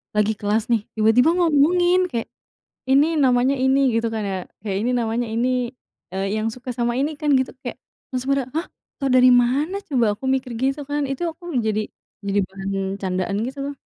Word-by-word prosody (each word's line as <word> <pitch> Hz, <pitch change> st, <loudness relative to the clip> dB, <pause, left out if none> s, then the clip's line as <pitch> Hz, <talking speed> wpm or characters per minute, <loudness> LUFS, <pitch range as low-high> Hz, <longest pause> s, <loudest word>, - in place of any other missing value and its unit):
lagi 210 Hz, +1 st, +3 dB
kelas 210 Hz, +1 st, +1 dB
nih, 225 Hz, -3 st, +3 dB
tiba-tiba 225 Hz, +7 st, +4 dB
ngomongin. 350 Hz, +2 st, +3 dB
Kayak, 230 Hz, -1 st, -3 dB, 0.6 s
"Ini 280 Hz, +3 st, +5 dB, 0.2 s
namanya 255 Hz, +2 st, +3 dB
ini" 265 Hz, +1 st, +4 dB, 0.2 s
gitu 230 Hz, 0 st, +1 dB
kan, 215 Hz, -, -2 dB
ya. -, -, -2 dB, 0.3 s
Kayak, 195 Hz, -1 st, -1 dB
"Ini 245 Hz, -, 0 dB
namanya 230 Hz, +1 st, -1 dB
ini, 240 Hz, +2 st, +1 dB, 0.6 s
eee, 195 Hz, +1 st, -2 dB, 0.2 s
yang 225 Hz, -, 0 dB
suka 250 Hz, -1 st, -7 dB
sama 240 Hz, 0 st, +1 dB
ini, 300 Hz, +2 st, -1 dB
kan?" 300 Hz, -1 st, 0 dB
Gitu 260 Hz, -, -2 dB
kek 245 Hz, -, -5 dB, 0.3 s
langsung 255 Hz, +1 st, -3 dB
pada, 260 Hz, -2 st, -2 dB
"Hah? 330 Hz, +2 st, -1 dB, 0.3 s
Tau 275 Hz, -, -2 dB
dari 255 Hz, 0 st, +7 dB
mana 265 Hz, +10 st, +3 dB
coba?" 250 Hz, -5 st, +2 dB
Aku 265 Hz, -, -6 dB
mikir 255 Hz, -1 st, -3 dB
gitu, 270 Hz, +3 st, 0 dB
kan. 290 Hz, -1 st, 0 dB
Itu 270 Hz, +5 st, -4 dB
aku 325 Hz, +2 st, -16 dB, 0.2 s
jadi 215 Hz, 0 st, 0 dB, 0.4 s
jadi 200 Hz, 0 st, +1 dB
bahan 195 Hz, 0 st, -3 dB
candaan, 185 Hz, +1 st, -1 dB
gitu 270 Hz, +2 st, -7 dB
loh. 285 Hz, +1 st, -3 dB
250 Hz, 185 wpm, -22 LUFS, 220-280 Hz, 0.6 s, dari